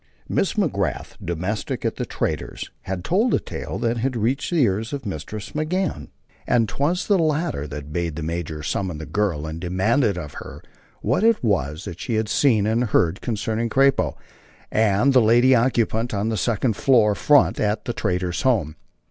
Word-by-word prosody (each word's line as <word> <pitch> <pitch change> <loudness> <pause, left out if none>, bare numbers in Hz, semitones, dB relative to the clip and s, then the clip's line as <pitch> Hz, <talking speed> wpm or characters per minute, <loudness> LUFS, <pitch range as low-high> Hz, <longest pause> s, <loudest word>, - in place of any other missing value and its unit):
Miss - - 0
McGrath, - - -1
domestic 90 +6 -3
at - - -1
the - - -3
trader's, - - -3
had 95 -2 -4
told 220 - +2
a - - +1
tale - - -6
that 115 0 0
had 125 +2 -1
reached 120 +5 0
the 170 -5 +3
ears 110 +4 0
of 140 -3 -5
Mistress 100 +3 -6
McGann, 155 - -2 0.4
and 115 -2 +3
'twas 150 - -1
the 200 -3 +3
latter 155 - 0
that 75 +1 -8
bade 85 -2 -2
the 80 - -4
major 80 -2 -4
summon 90 0 -2
the 80 - -6
girl 85 -2 -1
and 80 +1 -6
demand 95 +10 +1
of 90 - -1
her - - -10 0.4
what - - +1
it 230 - +3
was 80 - -1
she 115 - -3
had 110 -1 0
seen 115 -8 +3
and 115 +3 +1
heard 90 -4 +1
concerning 115 0 -2
"Crappo" 135 +3 +3 0.6
and 110 +5 +3
the 130 - +6
lady 120 +4 +5
occupant 115 -2 +1
of 100 +2 0
the 110 - -1
second 110 +2 0
floor 115 -3 +4
front 145 +6 +3
at 105 0 0
the 120 - -2
trader's 90 -4 -1
home. 100 - +1
110 Hz, 175 wpm, -23 LUFS, 90-130 Hz, 0.6 s, the